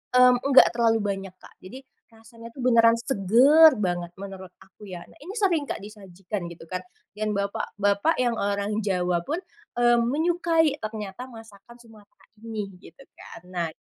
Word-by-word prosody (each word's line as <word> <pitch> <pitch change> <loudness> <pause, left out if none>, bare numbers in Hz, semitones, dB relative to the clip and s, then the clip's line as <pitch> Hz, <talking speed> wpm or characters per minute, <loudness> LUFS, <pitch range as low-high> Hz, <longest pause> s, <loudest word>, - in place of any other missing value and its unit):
mmm, 250 0 +7
enggak 270 -1 +7
terlalu 230 -1 +2
banyak, 195 -1 -4
Kak. - - -17
Jadi 230 +8 -10 0.3
rasanya 230 0 -15
tuh 260 - -7
beneran 230 -2 +5
seger 265 - +5
banget 175 -3 -2
menurut 190 -2 -9
aku 205 +2 -16
ya. 180 -2 -8
Nah, - - -20
ini 370 +9 -9
sering 370 -9 +1
nggak - - -4
disajikan 195 -2 -7
gitu 170 -1 -11
kan, 185 +3 -5 0.4
yang 215 -1 -1
bapak-bapak 200 +5 -1
yang 240 -2 0
orang 200 +1 -1
Jawa 180 -4 0
pun, 315 +4 -2 0.4
eee, 240 0 +3
menyukai 325 +5 +1
ternyata 215 +2 -7
masakan 225 -2 -15
Sumatera 220 -3 -20 0.2
ini, 220 -1 -5
begitu 180 +5 -17
kan. 225 - -13
Nah 175 -2 -2
220 Hz, 155 wpm, -25 LUFS, 195-245 Hz, 0.4 s, mmm